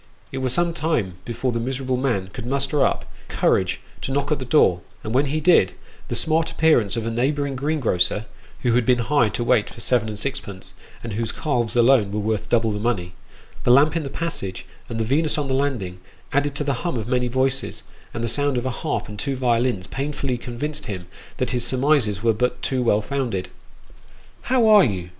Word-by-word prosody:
It 135 - -3
was 130 -1 0
some 170 +4 +1
time 145 - -1
before 120 +2 -2
the 115 - -1
miserable 130 +1 -2
man 120 -8 -1
could 120 -1 -6
muster 140 +2 +1
up - - 0 0.2
courage - - +1 0.2
to - - -3
knock 140 +2 -1
at 150 - +1
the 130 - -5
door, 95 - +4 0.2
and 110 - -4
when 140 +3 +3
he 155 +3 -1
did, 155 - +4 0.3
the - - -3
smart 160 +1 +2
appearance 155 -10 +3
of 115 - -2
a 115 - -1
neighbouring 140 +4 0
greengrocer 125 - 0 0.4
(who 120 -2 +2
had 125 +1 +3
been 125 +1 +3
hired 120 -2 +2
to 120 - -1
wait 120 -3 +2
for - - -12
seven 120 -3 +1
and 105 - -5
sixpence, 105 -6 -5 0.3
and 115 -2 -5
whose 115 +1 -1
calves 125 -8 -1
alone 120 -4 +4
were 105 - -1
worth 110 0 -2
double 115 -2 +2
the 105 - -3
money), 100 -6 -1 0.5
the - - +1
lamp 145 +5 +6
in 165 - +1
the 140 - -5
passage, 135 - -4 0.2
and 115 - -4
the - - +1
Venus 150 +6 +1
on 145 -2 -1
the 135 - -1
landing, 125 -10 -1 0.3
added 140 0 +1
to 150 - -1
the 140 -4 -1
hum 170 -7 -2
of 110 -1 -4
many 125 0 +1
voices, 130 +2 -1 0.3
and 115 - -4
the - - 0
sound 145 +2 0
of 120 - -2
a 130 - 0
harp - - -3
and 105 -1 -8
two 135 +5 -2
violins, 120 -5 +1
painfully 140 0 -3
convinced 145 +6 -5
him 95 -4 -5 0.3
that 130 - -1
his 125 -1 0
surmises 125 -6 +2
were 115 -1 +4
but 125 +3 0
too 130 -2 0
well 105 -3 +2
founded. 120 -7 -2 0.5
" - - -27
How 250 -2 +4
are 210 -2 +8
you 90 - -1
125 Hz, 210 wpm, -23 LUFS, 110-140 Hz, 0.5 s, are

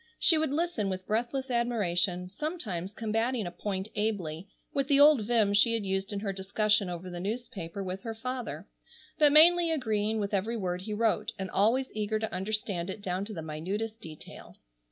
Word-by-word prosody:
She 330 - +5
would 315 -1 +1
listen 290 - -1
with 185 0 -4
breathless 245 +4 -1
admiration, 195 -7 0
sometimes 200 - -4
combating 225 +2 -1
a 175 - -4
point 190 +1 -4
ably, 195 -5 -2 0.3
with 275 -1 0
the 280 -1 +4
old 285 -7 +6
vim 220 -4 +3
she 230 +3 +4
had 220 -3 -2
used 195 +1 -1
in 200 -1 -3
her 200 -2 -2
discussion 205 +1 +1
over 175 +1 -6
the 175 -1 -6
newspaper 200 -3 -5
with 185 +1 -5
her 225 +1 -5
father, 255 +1 -5 0.5
but 300 -2 +6
mainly 340 +3 +7
agreeing 220 -7 0
with 200 0 -3
every 215 +4 0
word 180 -3 -2
he 210 +3 -5
wrote, 225 0 0
and 190 -1 -5
always 235 +7 +2
eager 215 0 -1
to 220 0 -4
understand 195 -2 -2
it 200 +2 -6
down 185 +1 -2
to 215 - -7
the 160 - -5
minutest 200 +9 -4
detail. 155 -2 -11
210 Hz, 185 wpm, -29 LUFS, 190-235 Hz, 0.5 s, mainly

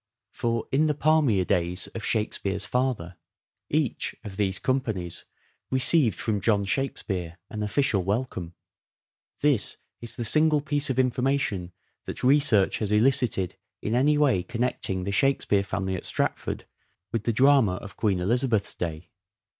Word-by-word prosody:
For, 115 -1 -2
in 150 +4 +3
the 150 - 0
palmier 145 - +3
days 90 -1 0
of 115 - -6
Shakspere's 105 -3 -1
father 120 -10 -2 0.3
" - - -63
each 150 -4 -1
(of 100 -4 -8
these 95 -2 0
companies) 100 -10 -2 0.4
received 130 - +3
from 105 -3 -1
John 100 -1 +2
Shakspere 95 - -2
an 105 - -5
official 105 -2 +1
welcome." 95 -4 -3 0.9
This 140 -7 +1 0.2
is 120 - -5
the 120 - -3
single 155 +5 +4
piece 145 0 -2
of 130 - -1
informa 130 +2 +2
tion 90 -8 -3 0.3
that - - -6
research 130 -7 +4
has 105 -2 0
elicited 110 -5 +2 0.2
in 110 - -3
any 145 +5 +3
way 140 -11 +3
connecting 115 -4 -2
the 100 - -2
Shakspere 105 -3 +2
family 95 -1 -3
at 90 - -5
Stratford - - -2 0.5
with 115 -2 -2
the 115 - +2
drama 130 -5 +4
of 100 +2 -9
Queen 100 -5 0
Elizabeth's 115 +2 +1
day. 80 -1 -5
110 Hz, 145 wpm, -26 LUFS, 95-135 Hz, 0.9 s, single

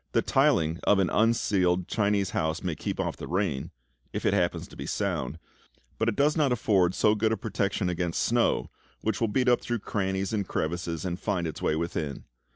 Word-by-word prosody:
The - - +3
tiling 80 +1 +2
of 105 - +4
an 95 -2 +2
unceiled 95 -5 +2
Chinese 100 -3 +1
house 80 +1 -1
may 90 -3 -1
keep - - -4
off - - -2
the - - -7
rain 90 -7 -1 0.4
if - - -3
it - - +3
happens 90 -3 0
to - - -13
be - - -6
sound 80 -8 -2 0.6
but 110 - +2
it 110 - -2
does 150 +2 +3
not 150 -5 +2
afford 95 -6 +2
so 105 - +4
good 110 +1 +1
a 110 - +1
protection 100 -3 -1
against 85 -1 -1
snow, 120 0 +1 0.3
which 110 0 -1
will 115 - +3
beat 125 +4 +1
up 120 -1 +4
through 120 - -2
crannies 95 -2 -2
and 100 -4 -1
crevices, 85 +1 -2
and 90 -1 -3
find 95 -5 -1
its 80 - -5
way 75 - +1
within. 80 -3 -3
95 Hz, 200 wpm, -27 LUFS, 85-110 Hz, 0.6 s, of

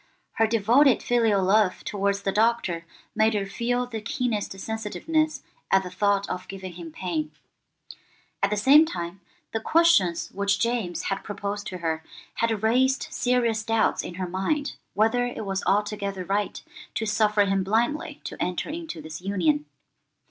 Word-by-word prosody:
Her 225 - +2
devoted 235 +5 +4
filial 225 -5 +2
love 195 0 +3
towards 200 0 -1
the 195 - +1
Doctor 200 -6 +1 0.3
made 220 0 +3
her 200 -1 0
feel 245 +5 -1
the 225 -3 -6
keenest 210 -4 -2
sensitiveness 275 - -1 0.3
at 195 0 +4
the 180 - -7
thought 200 +1 +1
of 185 0 -5
giving 190 -2 -7
him 170 -1 -9
pain. 155 -3 -3 1.1
At 200 - +3
the 210 - -1
same 275 +9 +7
time, 175 - -5 0.3
the 225 - 0
questions 220 - +3
which 200 0 0
James 230 -7 -1
had 195 0 -2
proposed 205 0 -4
to 185 - -5
her 160 -2 -2 0.3
had 225 -2 -1
raised 260 +4 +2
serious 245 -3 +1
doubts 225 -1 +1
in 175 - -7
her 185 0 -3
mind 195 - -1 0.2
whether 225 +4 +3
it 230 -3 -5
was 195 -1 -2
altogether 200 -2 0
right 200 +2 -1 0.3
to 220 - -1
suffer 210 -1 +3
him 195 -1 +1
blindly 235 +10 0
to - - -6
enter 180 - -2
into 320 - -6
this 160 +2 -8
union. 165 -6 +1
205 Hz, 155 wpm, -25 LUFS, 190-230 Hz, 1.1 s, same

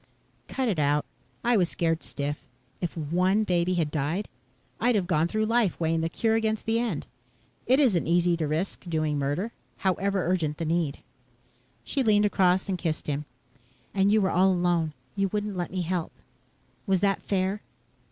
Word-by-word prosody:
"Cut 265 -2 -1
it 195 -8 0
out. 145 0 +2 0.4
I 240 0 +3
was 180 -5 +3
scared 165 -1 0
stiff. 145 0 -4 0.4
If 175 -1 -3
one 180 +7 +2
baby 180 -2 +1
had 160 -4 0
died, 155 +7 -1 0.5
I'd 245 -1 +3
have 195 -4 +1
gone 165 -2 +2
through 215 +4 0
life 225 -4 +1
weighing 165 0 +1
the 165 - 0
cure 220 +6 0
against 220 -1 0
the 225 +1 +2
end. 220 -11 -2 0.6
It 260 +3 +5
isn't 225 - +3
easy 175 +1 +3
to 160 -2 -1
risk 170 +4 -2
doing 155 -3 0
murder 145 +11 -1 0.3
however 195 0 +1
urgent 160 -5 0
the 165 - -3
need." 160 -3 -1 0.8
She 275 - -1
leaned 210 -4 +4
across 185 -2 +2
and 190 -2 -2
kissed 160 -3 -2
him. 145 0 -2 0.7
"And 195 0 +3
you 215 0 +4
were 190 - +1
all 190 +2 +4
alone. 175 -3 +1 0.2
You 195 0 +1
wouldn't 205 +1 -3
let 175 -1 -2
me 185 -1 -2
help. 175 -1 -2 0.8
Was 190 -2 +2
that 200 -1 +2
fair?" 195 +1 -1
180 Hz, 175 wpm, -27 LUFS, 165-205 Hz, 0.8 s, It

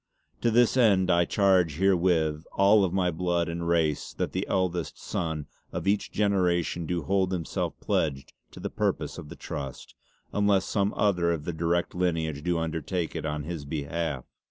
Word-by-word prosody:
To 120 - +3
this 120 +2 +4
end 95 -7 +4
I 85 0 +4
charge 95 -6 +3
herewith 85 -4 +2
all 100 +1 +5
of 95 - +1
my 90 -1 +1
blood 85 0 0
and 85 0 -3
race 80 -3 +1
that - - -2
the - - -2
eldest 90 -3 -1
sonne 80 -3 -3 0.3
of - - -4
each 100 +1 +1
generation 90 -5 +1
do 85 -2 -1
hold 95 +2 +1
himself 90 -3 -3
pledged 70 -4 -1 0.2
to - - -12
the - - -4
purpose - - -1
of 75 - -10
the - - -8
Trust, 70 -2 -7 0.4
unless 100 -2 +3
some 100 0 0
other 90 -5 +2
of 80 -3 -2
the 85 - -2
direct 85 +2 0
lineage 80 -5 -1
do 90 +1 0
undertake 80 +1 -2
it - - -3
on 75 0 -3
his 80 -1 -5
behalf. 75 -1 -3
85 Hz, 175 wpm, -27 LUFS, 80-95 Hz, 0.4 s, all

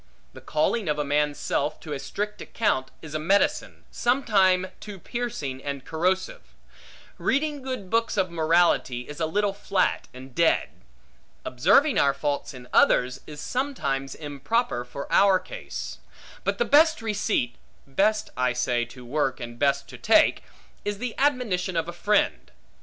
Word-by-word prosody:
The - - -12
calling 170 +5 0
of 150 - +1
a 150 - 0
man's 145 0 +1
self 145 +2 -1
to 150 - -6
a 140 - -4
strict 210 +8 -4
account, 130 -12 0
is 155 -2 -8
a 155 - -1
medicine, 195 +6 +1
sometime 195 -7 +2
too 205 -2 -8
piercing 170 - -4
and 140 -2 -5
corrosive. 185 +4 -2 0.6
Reading 290 +1 0
good 255 -8 -5
books 230 -1 +1
of 185 -3 +1
morality, 165 -6 +2
is 150 +1 -8
a 160 - +1
little 205 +4 0
flat 200 -2 0
and 130 0 -12
dead. 170 +3 +2 0.8
Observing 205 - +4
our 140 -1 +3
faults 145 +1 -2
in 125 -2 -11
others, 125 0 +3
is 150 -1 -9
sometimes 140 - -2
improper 150 - -1
for 130 +3 -7
our 195 -1 +6
case. - - -7 0.4
But - - 0
the 480 - +1
best 310 -2 +4
receipt 205 - -1 0.3
(best, 205 +10 +1
I 125 -1 +1
say, 120 -1 0
to 125 +1 -13
work, 135 +1 -1
and 120 -1 -8
best 140 -1 +1
to - - -10
take) - - +4 0.4
is 205 0 -2
the 245 +2 -4
admonition 225 -11 +1
of 165 0 0
a 175 - -5
friend. 205 +4 +1
170 Hz, 155 wpm, -25 LUFS, 140-210 Hz, 0.8 s, our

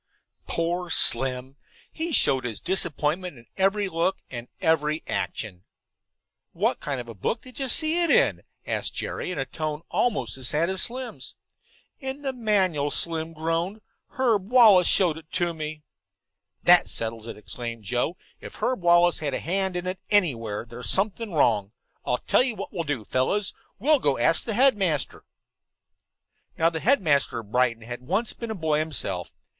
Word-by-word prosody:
Poor 175 +1 -1
Slim! 130 -1 +3 0.3
He 330 +1 -4
showed 135 - +4
his 115 -3 -4
disappointment 175 -2 -1
in 120 - -16
every 195 +1 +1
look 170 +2 0
and 120 -1 -6
every 160 -2 +1
action. 95 -5 -4 0.9
"What - - 0
kind 140 -3 -3
of 120 - -7
a 115 - -8
book 115 - -3
did 255 +1 -11
you 270 - -1
see 315 +5 +2
it 340 - +1
in?" 480 +1 +3 0.2
asked - - -2
Jerry, - - -4
in 180 - -4
a 135 - -1
tone 155 +3 -4
almost 135 - 0
as 130 -2 -2
sad 165 +6 +1
as 190 - -1
Slim's. 250 +1 -4 0.6
"In 265 0 -6
the 270 -1 -2
manual," 190 - +1
Slim 165 +1 +1
groaned. 165 +6 -2 0.3
"Herb 220 -7 0
Wallace 220 -8 +7
showed 170 -5 +4
it 160 -1 -21
to 175 -2 0
me." 155 -1 -6 0.8
"That - - +6
settles 115 0 -4
it," - - -7
exclaimed 115 +1 -6
Joe. 125 - -1 0.2
"If - - -10
Herb 255 -6 -1
Wallace 175 0 +4
had 145 -4 -2
a - - -2
hand 190 +2 -1
in 180 0 -3
it 185 +1 -3
anywhere 120 - +1
there's 120 +1 -4
something 205 +2 +1
wrong. 110 - +2 0.3
I'll 125 - 0
tell - - +4
you 250 -3 0
what - - -7
we'll 170 -4 -3
do, 135 -7 -3
fellows. 185 - 0 0.2
We'll 295 +6 +3
go 140 - +1
and 120 - 0
ask 165 - +3
the 225 - -2
headmaster." 205 - +1 1.3
Now 165 +1 +3
the 160 - -3
headmaster 165 - +2
of 105 -2 -18
Brighton 120 -2 +1
had 120 +2 -7
once 195 - -1
been 235 - -7
a 220 - -3
boy 160 -4 0
himself. 155 -4 -2
165 Hz, 170 wpm, -25 LUFS, 130-200 Hz, 1.3 s, Wallace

